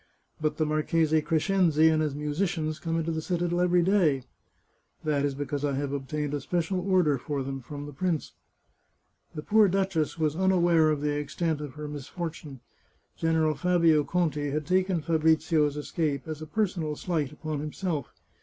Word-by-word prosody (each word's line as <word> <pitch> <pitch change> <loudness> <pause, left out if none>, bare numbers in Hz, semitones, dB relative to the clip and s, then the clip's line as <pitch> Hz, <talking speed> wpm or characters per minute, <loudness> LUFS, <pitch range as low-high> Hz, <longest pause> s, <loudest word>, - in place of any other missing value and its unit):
" - - -30
But 155 -1 0
the 155 - +1
Marchese 155 +1 +2
Crescenzi 160 -1 +3
and 155 -1 +2
his 150 -3 -1
musicians 155 +1 -2
come 165 -1 -2
into 165 0 -1
the 160 -1 -2
citadel 175 +1 -1
every 180 -1 +3
day." 165 -9 +3 0.4
" - - -42
That 150 -2 +1
is 140 -1 0
because 145 0 -3
I 145 -1 0
have 140 0 -2
obtained 145 +1 -3
a 145 - -2
special 175 +5 -1
order 180 -7 +2
for 140 +1 -3
them 135 0 -5
from 145 +3 -7
the 145 - -9
prince." 170 +1 -2 1.0
The 150 - -5
poor 215 +2 +5
duchess 190 -5 0
was 155 -2 0
unaware 175 -3 +3
of 150 -2 0
the 150 0 0
extent 150 +1 -2
of 145 -2 -7
her 150 0 -6
mis 145 -3 -7
fortune. 155 -6 -6 0.5
General 160 -1 +1
Fabio 170 -3 +3
Conti 150 -4 0
had 150 +1 -2
taken 185 0 +1
Fabrizio's 160 -2 +2
escape 150 -2 -2
as 155 -1 -5
a 155 - -6
personal 170 -4 -1
slight 155 -4 -2
upon 150 0 -4
himself. 150 -1 -3
155 Hz, 175 wpm, -27 LUFS, 145-175 Hz, 1.0 s, poor